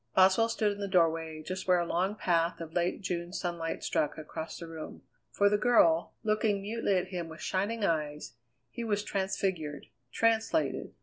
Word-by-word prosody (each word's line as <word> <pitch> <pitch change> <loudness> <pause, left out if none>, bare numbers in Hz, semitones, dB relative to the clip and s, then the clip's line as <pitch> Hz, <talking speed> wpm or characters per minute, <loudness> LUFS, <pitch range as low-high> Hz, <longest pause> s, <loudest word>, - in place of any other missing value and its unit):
Boswell 190 +5 +5
stood 215 -2 +1
in 205 - -6
the 200 - -2
doorway, 165 -4 +1
just 185 +3 -5
where 180 -1 +5
a 175 - +1
long 185 +5 0
path 170 -4 +1
of 165 -1 -7
late 175 +2 0
June 175 -1 -3
sunlight 170 -3 -3
struck 150 - 0
across 160 +1 -6
the 170 - -7
room. 160 -1 -8 0.3
For 200 - +3
the 205 0 +3
girl, 170 -9 +4
looking 215 -1 +1
mutely 210 -1 0
at 180 0 -2
him 175 -3 -4
with 160 - -10
shining 205 +3 -1
eyes, 150 - -2 0.4
he 235 - -5
was 210 -2 0
transfigured, 190 -7 -2 0.3
translated. 230 +7 +1
180 Hz, 175 wpm, -30 LUFS, 165-205 Hz, 0.4 s, Boswell